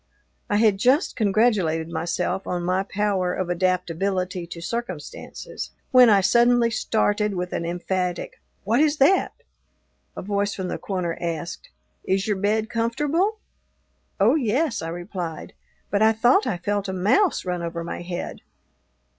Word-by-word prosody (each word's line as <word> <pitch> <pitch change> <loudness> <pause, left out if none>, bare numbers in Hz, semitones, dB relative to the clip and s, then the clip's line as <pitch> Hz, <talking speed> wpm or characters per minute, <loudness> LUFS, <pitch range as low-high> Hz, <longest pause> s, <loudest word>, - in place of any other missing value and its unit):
I 205 - +1
had 210 -2 +3
just 260 - +3
congratulated 200 -7 +2
myself 170 +3 -2
on 175 -1 -2
my 185 +1 +1
power 195 -2 -1
of 185 -2 -2
adaptability 180 0 -1
to 170 0 -8
circumstances, 180 -4 -6 0.2
when 250 -2 +8
I 200 -2 +5
suddenly 235 +3 +4
started 210 -2 0
with 180 0 -3
an 170 - -2
emphatic 180 0 -3 0.2
"What 225 +5 +2
is 300 0 +3
that?" 325 +8 +3 0.8
A - - -5
voice 200 +1 -1
from 185 -2 -4
the - - -4
corner 180 -4 -2
asked, 170 0 -4 0.3
"Is 190 +2 0
your 205 -2 0
bed 215 +3 0
comfortable?" 295 - 0 0.8
"Oh, 210 +6 +5
yes," 270 0 0
I 165 - -4
replied, 175 -1 -6 0.4
"but 205 - +1
I 220 +1 +5
thought 240 +4 +3
I 210 -8 -1
felt 200 +3 -2
a 190 - -3
mouse 230 - +2
run 180 -1 -2
over 170 0 -4
my 170 - -5
head." 175 0 -5
195 Hz, 145 wpm, -24 LUFS, 180-230 Hz, 0.8 s, when